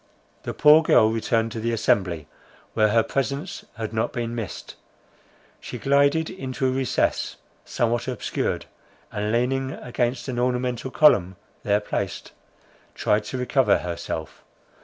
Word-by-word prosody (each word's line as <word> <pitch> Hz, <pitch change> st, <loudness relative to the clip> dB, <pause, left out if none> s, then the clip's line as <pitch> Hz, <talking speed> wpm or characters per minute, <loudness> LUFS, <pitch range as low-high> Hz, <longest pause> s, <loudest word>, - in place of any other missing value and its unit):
The -, -, -5 dB
poor 150 Hz, +2 st, +7 dB
girl 110 Hz, -8 st, +4 dB
returned 115 Hz, 0 st, 0 dB
to 115 Hz, -, -5 dB
the 115 Hz, +1 st, -1 dB
assembly, 90 Hz, -8 st, +1 dB, 0.5 s
where 110 Hz, -, +4 dB
her 115 Hz, +2 st, +3 dB
presence 140 Hz, +8 st, -3 dB
had 110 Hz, 0 st, -5 dB
not 110 Hz, 0 st, 0 dB
been 120 Hz, -3 st, -3 dB
missed. 115 Hz, -4 st, -6 dB, 0.8 s
She -, -, -7 dB
glided 140 Hz, +3 st, +3 dB
into 130 Hz, -7 st, -4 dB
a 130 Hz, -, +3 dB
recess 130 Hz, 0 st, 0 dB, 0.3 s
somewhat 120 Hz, +1 st, -1 dB
obscured, 130 Hz, -, -2 dB, 0.5 s
and 105 Hz, +1 st, -2 dB
leaning 130 Hz, +3 st, 0 dB
against 120 Hz, +1 st, -2 dB
an 125 Hz, -2 st, -2 dB
ornamental 125 Hz, 0 st, -1 dB
column 100 Hz, -, +4 dB, 0.3 s
there 105 Hz, 0 st, +2 dB
placed, 100 Hz, -2 st, -4 dB, 0.6 s
tried 105 Hz, 0 st, +1 dB
to 130 Hz, -, -4 dB
recover 130 Hz, +1 st, +3 dB
herself. 85 Hz, -2 st, -5 dB
120 Hz, 135 wpm, -24 LUFS, 110-130 Hz, 0.8 s, poor